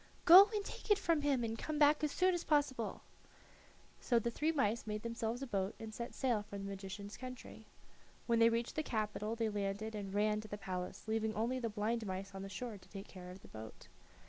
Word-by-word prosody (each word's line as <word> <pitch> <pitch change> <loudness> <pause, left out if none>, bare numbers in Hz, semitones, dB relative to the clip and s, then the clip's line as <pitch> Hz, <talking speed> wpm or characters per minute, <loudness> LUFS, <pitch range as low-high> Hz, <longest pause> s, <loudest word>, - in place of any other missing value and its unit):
"Go 370 +4 +11
and 410 -1 -1
take - - -8
it 415 - +6
from 335 -6 +1
him, 280 -4 +2
and 225 -1 -2
come 305 +6 -3
back 295 0 +5
as 300 - +1
soon 370 +3 +3
as 350 -1 -1
possible." 280 -6 0 1.0
So 240 - +2
the 235 +1 +1
three 305 +7 +1
mice 235 -6 0
made 210 0 -3
themselves 230 +2 -2
a - - -2
boat 195 -4 -2
and 220 -1 -7
set 235 +2 -6
sail 245 -5 +1
for 205 -1 -8
the 195 - -6
magician's 195 +1 -6
country. 250 -3 -9 0.6
When 230 -1 +2
they 230 0 +7
reached 230 +1 -1
the 310 - +1
capital 215 -4 -2
they 225 -1 0
landed 205 +1 -2
and 200 -2 -5
ran 210 +1 +1
to 215 - -10
the 205 - -5
palace, 185 -2 -5
leaving 220 0 0
only 235 +4 0
the 235 -2 -2
blind 215 +1 -1
mouse 195 +1 -4
on 195 - -6
the 195 - -6
shore 215 +1 -5
to - - -19
take 195 0 -8
care 180 -2 -10
of 185 +1 -10
the - - -12
boat. 110 0 -10
220 Hz, 225 wpm, -36 LUFS, 205-255 Hz, 1.0 s, Go